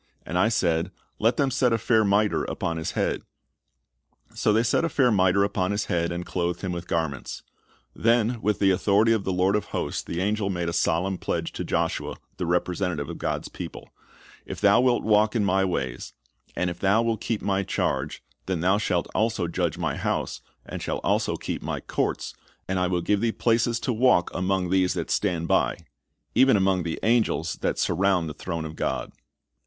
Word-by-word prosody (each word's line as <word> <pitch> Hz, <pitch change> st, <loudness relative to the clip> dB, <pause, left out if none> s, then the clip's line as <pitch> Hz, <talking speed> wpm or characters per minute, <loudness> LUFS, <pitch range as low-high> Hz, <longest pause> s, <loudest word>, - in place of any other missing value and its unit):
And 85 Hz, -, -5 dB
I 110 Hz, -, +4 dB
said, 85 Hz, -5 st, +1 dB, 0.3 s
Let 115 Hz, +3 st, +2 dB
them 140 Hz, -2 st, +2 dB
set 125 Hz, -1 st, +2 dB
a 115 Hz, -, +3 dB
fair 110 Hz, 0 st, +3 dB
miter, 105 Hz, +1 st, +2 dB
upon 85 Hz, 0 st, -3 dB
his 80 Hz, -, -3 dB
head. -, -, 0 dB, 1.1 s
So -, -, +1 dB
they 110 Hz, +2 st, +3 dB
set 120 Hz, -, +2 dB
a 165 Hz, -, +1 dB
fair 130 Hz, -6 st, +3 dB
miter 95 Hz, -1 st, +3 dB
upon 100 Hz, -2 st, 0 dB
his 100 Hz, +1 st, -1 dB
head, 85 Hz, 0 st, 0 dB
and 85 Hz, 0 st, -4 dB
clothed 85 Hz, -1 st, -2 dB
him 95 Hz, -, -3 dB
with 85 Hz, 0 st, -5 dB
garments." 80 Hz, -6 st, -3 dB, 0.5 s
Then 115 Hz, 0 st, +2 dB
with 105 Hz, -1 st, +1 dB
the 95 Hz, -1 st, +3 dB
authority 100 Hz, +4 st, +3 dB
of 110 Hz, -3 st, -1 dB
the 95 Hz, -, 0 dB
Lord 95 Hz, +2 st, +2 dB
of 105 Hz, -, 0 dB
hosts -, -, -3 dB
the 85 Hz, -, -5 dB
angel 105 Hz, +1 st, 0 dB
made 85 Hz, -3 st, -2 dB
a -, -, -4 dB
solemn 85 Hz, +2 st, 0 dB
pledge -, -, -2 dB
to -, -, -5 dB
Joshua, -, -, -1 dB, 0.2 s
the 90 Hz, -, -2 dB
representativ'e 90 Hz, -3 st, -1 dB
of -, -, -7 dB
God's -, -, -2 dB
people: -, -, -8 dB, 0.5 s
"If -, -, -7 dB
thou 105 Hz, +3 st, +5 dB
wilt 125 Hz, -1 st, +2 dB
walk 105 Hz, +1 st, +3 dB
in 105 Hz, -3 st, +2 dB
My 95 Hz, 0 st, +2 dB
ways, 65 Hz, -9 st, -3 dB, 0.4 s
and 90 Hz, 0 st, 0 dB
if 85 Hz, -, -9 dB
thou 100 Hz, +4 st, +3 dB
wilt 115 Hz, -2 st, -1 dB
keep 115 Hz, -3 st, -2 dB
My 100 Hz, -1 st, +1 dB
charge, 95 Hz, -, -2 dB, 0.2 s
then 95 Hz, -4 st, -1 dB
thou 95 Hz, +4 st, +3 dB
shalt 90 Hz, -5 st, 0 dB
also 110 Hz, -5 st, 0 dB
judge 85 Hz, -, -1 dB
My -, -, -2 dB
house, -, -, -2 dB, 0.2 s
and -, -, -6 dB
shalt -, -, -3 dB
also -, -, +1 dB
keep -, -, -4 dB
My -, -, -3 dB
courts, -, -, -2 dB, 0.3 s
and 95 Hz, 0 st, 0 dB
I 90 Hz, -, +2 dB
will 90 Hz, -1 st, 0 dB
give 100 Hz, +3 st, +1 dB
thee 115 Hz, -1 st, +2 dB
places 115 Hz, +1 st, +1 dB
to 125 Hz, -, -1 dB
walk 115 Hz, -6 st, +3 dB
among 90 Hz, -1 st, 0 dB
these 95 Hz, -1 st, +2 dB
that 85 Hz, -3 st, -3 dB
stand 85 Hz, -5 st, 0 dB
by,"' -, -, +2 dB, 0.3 s
— 75 Hz, -1 st, -50 dB
even 130 Hz, -4 st, +5 dB
among 95 Hz, -1 st, +2 dB
the 85 Hz, -1 st, -3 dB
angels 110 Hz, -7 st, +1 dB
that -, -, 0 dB
surround 90 Hz, -1 st, +1 dB
the 75 Hz, -, -5 dB
throne 85 Hz, +1 st, -4 dB
of 80 Hz, 0 st, -7 dB
God. -, -, -2 dB
95 Hz, 200 wpm, -25 LUFS, 85-110 Hz, 1.1 s, thou